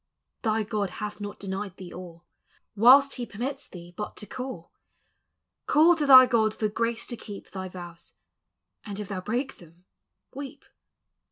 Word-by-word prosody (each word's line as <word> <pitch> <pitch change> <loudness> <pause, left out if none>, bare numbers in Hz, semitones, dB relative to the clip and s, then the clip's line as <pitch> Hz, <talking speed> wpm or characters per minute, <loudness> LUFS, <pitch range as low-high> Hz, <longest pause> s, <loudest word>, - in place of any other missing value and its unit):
Thy 220 -1 +1
(Jod 210 -2 -2
hath 210 -1 -5
not 205 0 -6
denied 195 -1 -5
thee 185 -2 -9
all, 175 -2 -10 0.5
Whilst 265 +6 +7
he 245 - -3
permits 260 +6 -5
thee 175 -1 -12
hut 210 - -6
to 210 - -7
call. 250 -6 -7 1.0
Call 320 +3 +6
to 300 -3 -1
thy 260 -1 +11
(Jod 220 -3 +2
for 215 - -1
grace 230 +2 -2
to 240 - -5
keep 205 -3 -10
Thy 190 -1 -5
vows; 175 -2 -11 0.7
and 205 -1 -6
it' 210 - -6
thou 190 -2 -4
break 240 +7 -3
them, 170 +1 -19 0.5
weep. 280 +1 -8
210 Hz, 160 wpm, -27 LUFS, 190-255 Hz, 1.0 s, thy